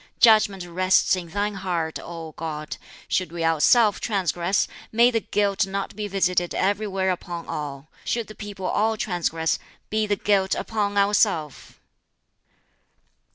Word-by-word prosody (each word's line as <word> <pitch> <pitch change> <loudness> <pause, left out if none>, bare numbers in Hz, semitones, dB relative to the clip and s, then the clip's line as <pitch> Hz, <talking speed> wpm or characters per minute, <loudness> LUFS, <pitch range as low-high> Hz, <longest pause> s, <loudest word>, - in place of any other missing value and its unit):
Judgment 215 -6 +5
rests 185 +2 +3
in 180 -2 -6
Thine 205 +5 -2
heart, 175 -4 -2
O 165 -2 -8
God. 155 -1 -5 0.3
Should 185 -3 0
we 170 -1 -4
ourself 205 +7 +4
transgress, 190 -2 0 0.2
may 235 +2 +5
the 230 - +1
guilt 200 -2 0
not 195 0 -4
be 210 0 -3
visited 180 -3 0
everywhere 195 -1 0
upon 175 -1 -5
all. 145 -1 -5 0.2
Should 235 -1 -1
the 215 - -11
people 205 -3 -7
all 220 +3 +1
transgress, 165 -5 -1 0.3
be 215 0 +1
the 205 - +2
guilt 195 -1 +1
upon 205 -2 -2
ourself!" 200 - +1
190 Hz, 135 wpm, -24 LUFS, 170-210 Hz, 0.3 s, Judgment